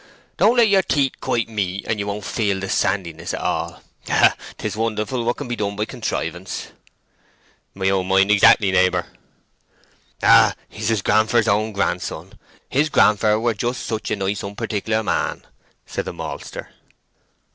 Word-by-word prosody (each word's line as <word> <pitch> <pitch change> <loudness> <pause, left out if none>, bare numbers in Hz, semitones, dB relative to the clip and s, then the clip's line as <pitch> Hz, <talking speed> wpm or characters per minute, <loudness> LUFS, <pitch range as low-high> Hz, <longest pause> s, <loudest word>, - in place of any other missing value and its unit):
"Don't 240 - +4
let 235 -2 +6
your 195 -2 +4
teeth 140 -7 0
quite 115 -1 0
meet, 100 -3 -3
and 110 - -2
you 100 - -3
won't 105 0 -4
feel 100 -4 -1
the 95 - -4
sandiness 85 -5 -1
at - - -5
all. - - -3 0.3
Ah! - - +4 0.2
'tis - - -4
wonderful 115 +2 -2
what 120 +1 -1
can 145 - -6
be 120 - -3
done 100 -2 -3
by 105 +1 -1
contrivance!" 90 -3 -4 1.1
"My 95 0 -1
own 95 -1 0
mind 95 +1 +3
exactly, 100 -1 +5
neighbour." 90 -1 +2 1.2
"Ah, - - +6
he's 110 0 -6
his 110 -4 0
grandfer's 110 +2 +3
own 110 +1 +1
grandson!—his 130 +7 -3
grandfer 105 -5 +3
were 115 0 +1
just 120 +3 -3
such 110 0 -3
a - - 0
nice 100 0 -2
unparticular 105 +2 -2
man!" - - -1 0.4
said - - -4
the - - -5
maltster. - - -7
105 Hz, 155 wpm, -21 LUFS, 95-115 Hz, 1.2 s, let